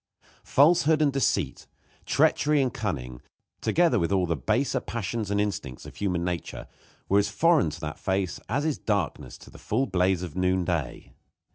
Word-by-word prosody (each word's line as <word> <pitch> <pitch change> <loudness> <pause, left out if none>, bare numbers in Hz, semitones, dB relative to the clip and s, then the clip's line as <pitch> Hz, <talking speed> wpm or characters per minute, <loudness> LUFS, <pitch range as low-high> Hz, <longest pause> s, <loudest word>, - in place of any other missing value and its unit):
Falsehood 155 +1 +4
and 145 -3 +2
deceit, 135 - -1 0.4
treachery 150 0 +3
and 130 -4 0
cunning, 65 - -4 0.4
together 170 -9 +2
with 85 +1 -1
all 95 -2 +2
the 85 -1 -1
baser 125 - 0
passions 115 -2 -4
and 100 0 0
instincts 95 -11 -3
of - - -11
human 90 -4 -1
nature, 90 -1 -4 0.4
were 100 - +4
as 100 0 +1
foreign 160 - +3
to 75 - -8
that 75 -1 -5
face 95 -1 -1
as 140 +6 0
is 155 -3 -1
darkness 100 -7 -2
to - - -15
the - - -14
full 125 +6 0
blaze 90 -3 +1
of 85 -3 -7
noonday. 90 -6 -1
100 Hz, 165 wpm, -26 LUFS, 90-135 Hz, 0.4 s, Falsehood